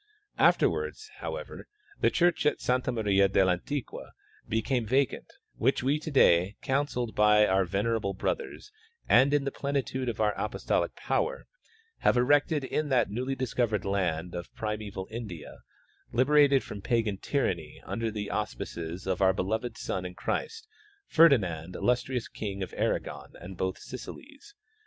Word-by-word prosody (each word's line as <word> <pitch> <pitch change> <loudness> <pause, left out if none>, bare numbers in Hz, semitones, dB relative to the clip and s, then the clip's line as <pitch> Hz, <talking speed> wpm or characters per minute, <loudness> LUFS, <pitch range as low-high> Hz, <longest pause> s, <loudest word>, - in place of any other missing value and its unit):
Afterwards, 435 -1 +2
however, - - -6 0.3
the - - +4
church 175 -3 +2
of - - +3
S.Maria 110 -6 +2
del 95 -1 +3
Antiqua 130 +10 -4 0.4
became 115 +3 0
vacant, 130 +4 0 0.3
which 130 +1 +1
we 140 +4 +2
to 155 - -6
day, 95 - +4
counselled 130 -4 -1
by 105 0 +5
our 95 -1 +2
venerable 100 +1 -1
brothers 420 - -4 0.4
and 130 +4 +5
in 145 -1 +2
the 140 - -2
plenitude 135 -3 -2
of 115 - -5
our 105 -1 +2
apostolic - - -1
power, - - -1 0.5
have - - +3
erected 145 +4 +3
in 150 +2 -2
that 125 -6 +2
newd}^ 130 +5 -2
discovered 120 -4 -1
land 90 -3 -1
of 85 -1 -6
primeval 105 -3 -4
India, 105 -9 -7 0.5
liberated 140 +2 +4
from 100 - -8
pagan 110 -3 0
tyranny 85 - -2
under 115 0 -2
the 105 -2 -4
auspices 85 -4 -4
of 95 0 -1
our 95 -1 +5
beloved 110 +5 -2
son 95 - -3
in 90 0 -7
Christ, 450 - -3 0.4
Ferdi 160 -4 +7
nand, 85 -4 -5
illustrious 125 0 0
king 100 -2 -5
of - - -7
Aragon - - -2
and 95 +1 -9
both 95 +1 -2
Sicilys. 290 - -10
115 Hz, 140 wpm, -29 LUFS, 95-135 Hz, 0.5 s, Ferdi